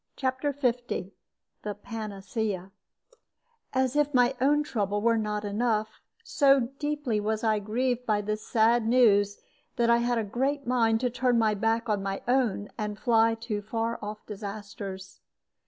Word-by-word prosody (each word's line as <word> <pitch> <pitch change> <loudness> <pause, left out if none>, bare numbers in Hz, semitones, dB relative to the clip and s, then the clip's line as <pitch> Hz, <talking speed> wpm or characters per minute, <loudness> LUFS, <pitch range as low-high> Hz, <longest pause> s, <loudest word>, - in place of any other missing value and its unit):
CHAPTER 265 +2 -1
L 245 -2 +5 0.9
THE 210 -1 -4
PANACEA 205 -2 -4 1.0
As 260 0 0
if 295 -1 +1
my 250 +1 +4
own 295 +3 +3
trouble 205 -7 -1
were 230 +1 +2
not 210 -1 -2
enough, 215 0 -1 0.2
so 275 -4 +3
deeply 295 -7 -1
was 215 +1 -2
I 215 -2 +2
grieved 245 +4 -1
by 210 -2 +2
this 215 +1 -3
sad 225 +1 +2
news 205 -5 +4 0.4
that 235 0 +3
I 235 - +6
had 240 0 +1
a 225 - 0
great 270 +7 -1
mind 230 -2 +2
to 250 -1 0
turn 250 0 +1 0.2
back 225 +2 +1
on 210 -2 0
my 195 0 -4
own 240 -5 +1
and 210 -1 -3
fly 225 -1 +3
to 215 -3 -3
far 225 +2 -2
off 210 +1 -7
disasters. 200 -2 -7
225 Hz, 150 wpm, -28 LUFS, 210-250 Hz, 1.0 s, I